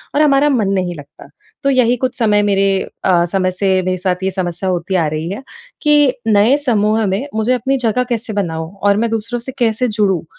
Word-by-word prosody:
और 300 Hz, -, +3 dB
हमारा 290 Hz, 0 st, +4 dB
मन 230 Hz, -8 st, +1 dB
नहीं 180 Hz, -2 st, -1 dB
लगता। 145 Hz, -1 st, -13 dB, 0.4 s
तो 275 Hz, -, +2 dB
यही 250 Hz, -2 st, +3 dB
कुछ 255 Hz, -, -4 dB
समय 210 Hz, -3 st, +3 dB
मेरे 195 Hz, 0 st, +2 dB, 0.4 s
अ, 175 Hz, -2 st, +3 dB
समय 185 Hz, +1 st, 0 dB
से 190 Hz, +1 st, 0 dB
मेरे 185 Hz, 0 st, -1 dB
साथ 180 Hz, 0 st, -2 dB
ये 190 Hz, -, 0 dB
समस्या 185 Hz, 0 st, -3 dB
होती 180 Hz, +1 st, -2 dB
आ 165 Hz, -4 st, +2 dB
रही 160 Hz, +3 st, -4 dB
है, 225 Hz, +7 st, -6 dB, 0.4 s
कि 295 Hz, -3 st, +4 dB
नए 215 Hz, +4 st, +4 dB
समूह 215 Hz, -1 st, +2 dB
में 195 Hz, +9 st, -2 dB
मुझे 220 Hz, +3 st, +1 dB
अपनी 265 Hz, +3 st, 0 dB
जगह 250 Hz, +4 st, +1 dB
कैसे 230 Hz, -1 st, -3 dB
बनाऊँ? 165 Hz, -4 st, -3 dB
और 200 Hz, 0 st, +3 dB
मैं 230 Hz, +1 st, 0 dB
दूसरों 225 Hz, +2 st, -2 dB
से 250 Hz, +3 st, -7 dB
कैसे 235 Hz, +1 st, +1 dB
जुड़ूँ? 205 Hz, -5 st, 0 dB
210 Hz, 210 wpm, -16 LUFS, 185-240 Hz, 0.4 s, हमारा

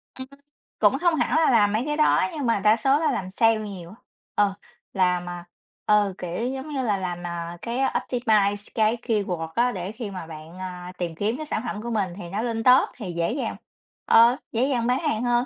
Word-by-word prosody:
Ừm, 260 Hz, 0 st, -8 dB, 0.5 s
cũng 210 Hz, +4 st, +4 dB
không 345 Hz, -1 st, +3 dB
hẳn 310 Hz, -, 0 dB
là 320 Hz, -3 st, +4 dB
làm 210 Hz, -4 st, +4 dB
mấy 220 Hz, +3 st, +1 dB
cái 295 Hz, 0 st, -2 dB
đó 305 Hz, -, +4 dB
nhưng 295 Hz, -4 st, -3 dB
mà 230 Hz, -3 st, +2 dB
đa 210 Hz, +3 st, +4 dB
số 275 Hz, +3 st, +3 dB
là 320 Hz, -, +1 dB
làm 185 Hz, -1 st, -3 dB
sale 225 Hz, +4 st, +3 dB
nhiều 195 Hz, -5 st, -7 dB
á. 200 Hz, -, -12 dB, 0.4 s
Ờ, 205 Hz, -1 st, +3 dB, 0.4 s
làm, 180 Hz, -2 st, +1 dB
à, 175 Hz, -1 st, -7 dB, 0.4 s
ờ, 205 Hz, -2 st, +3 dB
kiểu, 180 Hz, +7 st, -3 dB
giống 265 Hz, +3 st, -5 dB
như 275 Hz, -3 st, -2 dB
là, 210 Hz, -4 st, +1 dB
làm, 175 Hz, -2 st, -4 dB
à, 170 Hz, 0 st, -5 dB
cái 235 Hz, +1 st, -3 dB
optimize 215 Hz, -6 st, +1 dB
cái 220 Hz, +1 st, +2 dB
keyword 195 Hz, -9 st, -1 dB
á 245 Hz, +1 st, +3 dB
để 185 Hz, -2 st, -5 dB
khi 220 Hz, -2 st, -6 dB
mà 185 Hz, -4 st, -7 dB
bạn, 160 Hz, +2 st, -10 dB
à, 180 Hz, -1 st, -6 dB
tìm 170 Hz, -2 st, -3 dB
kiếm 210 Hz, +7 st, -1 dB
các 310 Hz, 0 st, -6 dB
sản 220 Hz, -, -2 dB
phẩm 210 Hz, -3 st, -4 dB
của 235 Hz, -, -5 dB
mình 195 Hz, -6 st, -1 dB
thì 175 Hz, -3 st, -8 dB
nó 200 Hz, +4 st, -2 dB
lên 225 Hz, -1 st, -2 dB
top 255 Hz, 0 st, +6 dB
thì 205 Hz, -7 st, -6 dB
dễ 170 Hz, +4 st, +1 dB
dàng 275 Hz, -, -3 dB, 0.5 s
ờ, 235 Hz, +3 st, +6 dB
dễ 235 Hz, +2 st, +1 dB
dàng 240 Hz, -4 st, 0 dB
bán 250 Hz, +2 st, +2 dB
hàng 290 Hz, -8 st, -1 dB
hơn. 240 Hz, 0 st, +2 dB
215 Hz, 225 wpm, -24 LUFS, 185-245 Hz, 0.5 s, top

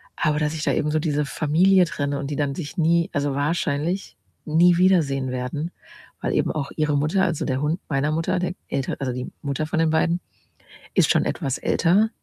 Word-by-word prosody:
aber 150 Hz, -2 st, +1 dB
dass 150 Hz, +1 st, 0 dB
ich 155 Hz, -1 st, -4 dB
da -, -, +1 dB
eben 150 Hz, 0 st, 0 dB
so 155 Hz, -, +1 dB
diese 150 Hz, -2 st, 0 dB
Familie 175 Hz, +6 st, +3 dB
trenne 145 Hz, -3 st, -2 dB
und 140 Hz, -, -4 dB
die -, -, -2 dB
dann 140 Hz, -1 st, -1 dB
sich 150 Hz, -2 st, -6 dB
nie 170 Hz, +1 st, +2 dB
also 145 Hz, -1 st, 0 dB
wahrscheinlich 155 Hz, -, -1 dB, 0.3 s
nie 170 Hz, +3 st, +4 dB
wiedersehen 150 Hz, -8 st, +2 dB
werden, 130 Hz, +7 st, -3 dB, 0.5 s
weil -, -, -1 dB
eben -, -, +1 dB
auch 145 Hz, -3 st, -4 dB
ihre 150 Hz, -2 st, +1 dB
Mutter, 160 Hz, +7 st, +1 dB
also, 170 Hz, -5 st, 0 dB
der 130 Hz, 0 st, -1 dB
Hund 155 Hz, +4 st, 0 dB
meiner 145 Hz, +1 st, +1 dB
Mutter, 170 Hz, +3 st, 0 dB
der 180 Hz, 0 st, -2 dB
Älter 135 Hz, -2 st, -2 dB
also, 130 Hz, -2 st, -2 dB
die 125 Hz, 0 st, -5 dB
Mutter 140 Hz, +2 st, -2 dB
von 160 Hz, -, -1 dB
den 160 Hz, -1 st, +2 dB
beiden, 165 Hz, +2 st, +2 dB, 0.7 s
ist -, -, +3 dB
schon -, -, +2 dB
etwas 135 Hz, -1 st, -2 dB
älter 195 Hz, +6 st, +2 dB
155 Hz, 200 wpm, -23 LUFS, 140-170 Hz, 0.7 s, nie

